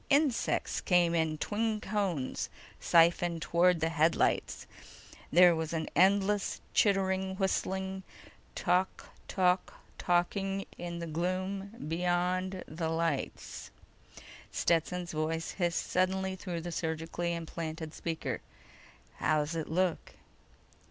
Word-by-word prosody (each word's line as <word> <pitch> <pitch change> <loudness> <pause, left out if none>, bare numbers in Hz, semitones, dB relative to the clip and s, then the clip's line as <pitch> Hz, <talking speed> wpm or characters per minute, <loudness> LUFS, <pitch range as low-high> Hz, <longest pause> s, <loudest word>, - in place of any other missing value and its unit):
Insects 285 -4 +2
came 175 -2 +3
in 160 -2 +1
twin 215 +5 -1
cones, 190 -10 -2 0.3
siphoned 170 0 +3
toward 170 -1 +3
the 160 - +2
headlights. 165 0 +1 0.7
There 175 +1 +7
was 160 0 -3
an 160 -1 -2
endless 195 +2 +3
chittering 190 -2 +2
whistling 190 0 -1 0.5
tok 180 +1 0 0.2
tok 185 -1 +1 0.2
toking 195 +2 0
in 170 -1 -5
the 170 - -4
gloom 185 +5 -2
beyond 180 +2 0
the 160 +1 -3
lights. 165 -3 -2 0.8
Stetson's 175 +1 0
voice 160 +1 -2
hissed 175 -3 -1
suddenly 190 +1 +1
through 180 -3 -5
the 175 +1 -5
surgically 165 +1 -2
implanted 160 -1 -5
speaker: 165 -1 -3 0.8
"How's 155 0 +1
it 160 -2 -3
look?" 180 +1 0
175 Hz, 105 wpm, -31 LUFS, 165-190 Hz, 0.8 s, There